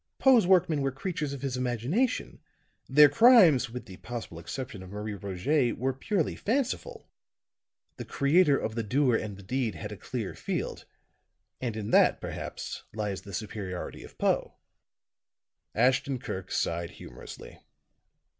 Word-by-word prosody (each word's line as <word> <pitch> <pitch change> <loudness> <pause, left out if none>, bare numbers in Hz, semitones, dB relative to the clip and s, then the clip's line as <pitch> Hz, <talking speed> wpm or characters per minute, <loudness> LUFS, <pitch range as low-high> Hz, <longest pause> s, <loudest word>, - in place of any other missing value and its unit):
Poe's 245 -8 +5
workmen 175 -5 +4
were 135 - +1
creatures 150 +1 -3
of 140 -1 -7
his 135 -2 -2
imagination, 125 - -1 0.5
their 150 +2 +8
crimes, 175 - +6
with 125 +2 -7
the 95 -2 -11
possible 115 -8 -7
exception 100 +4 -6
of 95 - -10
'Marie 105 +2 -5
Roget,' 100 - 0
were 130 +2 0
purely 165 - -1
fanciful. 280 - -2 0.9
The - - -6
creator 145 +1 +3
of 110 - -3
the 115 - -1
doer 125 +3 +2
and 105 -3 -3
the 100 - -12
deed 120 +1 -1
had - - -6
a - - -5
clear - - -5
field; - - -4 0.8
and 115 -4 -3
in 105 -1 -4
that, - - +5
perhaps, - - -6
lies 105 -3 -3
the 100 - -11
superiority 95 -2 -5
of - - -14
Poe." - - 0 1.2
Ashton 130 +3 +2
Kirk 95 -6 -6
sighed 85 0 -1
humorously. - - -11
125 Hz, 145 wpm, -28 LUFS, 105-150 Hz, 1.2 s, their